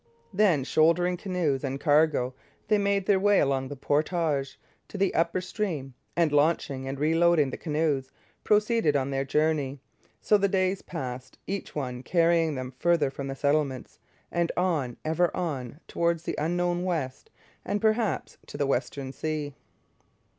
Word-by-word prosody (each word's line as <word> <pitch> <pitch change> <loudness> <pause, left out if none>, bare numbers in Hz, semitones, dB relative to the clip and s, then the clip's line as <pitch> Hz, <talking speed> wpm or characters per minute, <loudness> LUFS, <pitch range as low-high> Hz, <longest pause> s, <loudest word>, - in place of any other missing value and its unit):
Then, 185 -8 +3
shouldering 170 +5 +3
canoes 175 -7 -1
and 135 0 -3
cargo, 145 -4 +3 0.4
they 210 - +4
made 200 -1 +1
their 195 -1 +3
way 205 +1 +4
along 135 -1 +1
the 145 - -6
portage 145 0 0 0.3
to - - -8
the 195 -1 +1
upper 170 +2 +1
stream, 175 - -3 0.2
and, 170 -3 +2
launching 145 -3 +1
and 135 0 -4
reloading 160 -1 +3
the - - -4
canoes, 150 -4 -1 0.3
proceeded 210 -7 +2
on 140 0 0
their 135 0 0
journey. 145 -1 0 0.4
So 210 - +3
the 200 - +3
days 190 0 0
passed, 130 -6 -6
each 195 +1 -5
one 125 -4 -3
carrying 165 0 +2
them 130 -1 -5
farther 170 -5 +2
from 140 0 -6
the 135 - -4
settlements 140 -2 -1 0.3
and 170 -1 0
on, 160 -10 0
ever 160 +2 +2
on, 140 -5 -3
towards 170 -1 0
the - - -3
unknown 175 +2 0
West, 165 - -3 0.3
and 205 - -1
perhaps 220 0 0
to - - -8
the 145 - +1
Western 135 0 -2
Sea. 150 -2 -3
155 Hz, 155 wpm, -27 LUFS, 140-180 Hz, 0.4 s, they